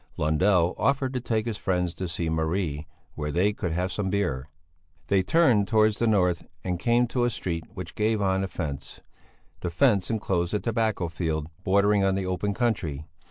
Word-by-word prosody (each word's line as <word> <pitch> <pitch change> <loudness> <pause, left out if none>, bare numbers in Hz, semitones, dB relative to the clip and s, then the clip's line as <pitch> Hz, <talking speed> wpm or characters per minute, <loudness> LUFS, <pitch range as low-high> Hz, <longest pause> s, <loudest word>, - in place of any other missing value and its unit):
Lundell 85 +3 +3
offered 135 +2 +1
to 130 - -1
take 115 -2 -1
his 115 -3 -3
friends 90 -2 0
to 95 - -4
see 85 0 -2
Marie, 80 -1 -1 0.3
where 75 -1 -3
they 95 +6 +2
could 90 -4 -3
have 90 +3 -1
some 100 -1 -2
beer. 75 -9 -1 0.6
They 100 -1 +4
turned 115 - +3
towards 110 -1 +3
the 115 - +2
north 90 -5 +2 0.2
and 90 -2 -2
came 120 +4 +3
to 125 0 0
a 120 - +3
street 85 -7 -3
which 90 -3 -7
gave 110 0 +1
on 95 -1 +1
a - - -1
fence; 70 -6 -6 0.6
the 90 - -3
fence 100 +2 +3
enclosed 95 -4 -1
a - - +1
tobacco 110 -6 0
field, 80 -2 -3
bordering 100 +1 +3
on 95 -1 +2
the 95 -1 -2
open 95 +2 -1
country. 90 - -1
95 Hz, 185 wpm, -26 LUFS, 85-110 Hz, 0.6 s, They